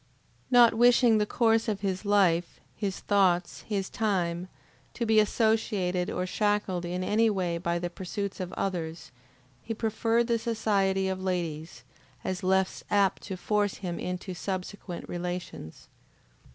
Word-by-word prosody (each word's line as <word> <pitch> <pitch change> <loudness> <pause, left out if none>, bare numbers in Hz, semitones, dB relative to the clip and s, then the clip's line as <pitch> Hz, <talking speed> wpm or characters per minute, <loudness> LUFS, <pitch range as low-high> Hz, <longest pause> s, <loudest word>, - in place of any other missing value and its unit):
Not 240 -2 +7
wishing 240 -1 +5
the 210 - +1
course 225 -1 +2
of 205 -3 -2
his 190 0 -2
life, 180 -4 +2 0.2
his 195 -2 -3
thoughts, 185 -4 +2
his 195 -3 -1
time, 180 -5 -1 0.5
to 235 - -1
be 220 -1 +4
associated 210 -5 +1
or 180 - -2
shackled 205 -2 0
in 180 +1 -3
any 220 +4 +3
way 180 -4 -1
by 170 0 -1
the 175 0 -3
pursuits 195 +2 -5
of 185 -1 -4
others, 165 -4 -4 0.5
he 225 - -5
preferred 225 +1 +1
the 230 -1 +1
society 200 -4 +1
of 190 0 -3
ladies, 165 -7 -3 0.4
as 185 -1 -3
less 190 0 +1
apt 200 -2 +2
to 190 - -6
force 205 +1 0
him 175 -3 -5
into 180 +1 -4
subsequent 185 0 -5
relations. 175 - -6
190 Hz, 140 wpm, -28 LUFS, 180-215 Hz, 0.5 s, Not